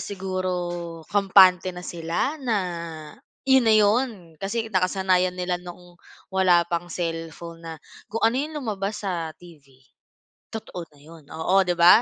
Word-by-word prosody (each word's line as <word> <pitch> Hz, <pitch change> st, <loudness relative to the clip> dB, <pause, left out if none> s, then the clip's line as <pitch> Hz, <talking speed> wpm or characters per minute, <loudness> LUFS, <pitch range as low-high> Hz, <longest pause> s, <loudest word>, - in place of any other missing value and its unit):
siguro 180 Hz, -3 st, -3 dB
kampante 190 Hz, -2 st, +5 dB
na 180 Hz, -, -8 dB
sila 170 Hz, -, -2 dB
na, 240 Hz, -5 st, 0 dB, 0.9 s
'yon 265 Hz, -2 st, +5 dB
na 220 Hz, -, +5 dB
'yon, 225 Hz, +5 st, +3 dB, 0.3 s
kasi 225 Hz, +3 st, -2 dB
nakasanayan 185 Hz, 0 st, +2 dB
nila 180 Hz, 0 st, -1 dB
noong 175 Hz, 0 st, -12 dB, 0.4 s
wala 180 Hz, -3 st, +4 dB
pang 175 Hz, 0 st, -3 dB
cellphone 165 Hz, 0 st, -5 dB
na 165 Hz, -, -6 dB, 0.4 s
kung 225 Hz, +2 st, -3 dB
ano 230 Hz, -, +2 dB
yung 305 Hz, +1 st, -5 dB
lumabas 205 Hz, -2 st, -3 dB
sa 170 Hz, -4 st, -2 dB
TV, 165 Hz, -5 st, -16 dB, 0.9 s
totoo 180 Hz, -6 st, -6 dB
na -, -, -21 dB
'yon. 160 Hz, +1 st, -15 dB
Oo, 180 Hz, +5 st, +2 dB
'di 175 Hz, -1 st, -1 dB
ba? 175 Hz, +6 st, +8 dB
180 Hz, 140 wpm, -24 LUFS, 170-200 Hz, 0.9 s, ba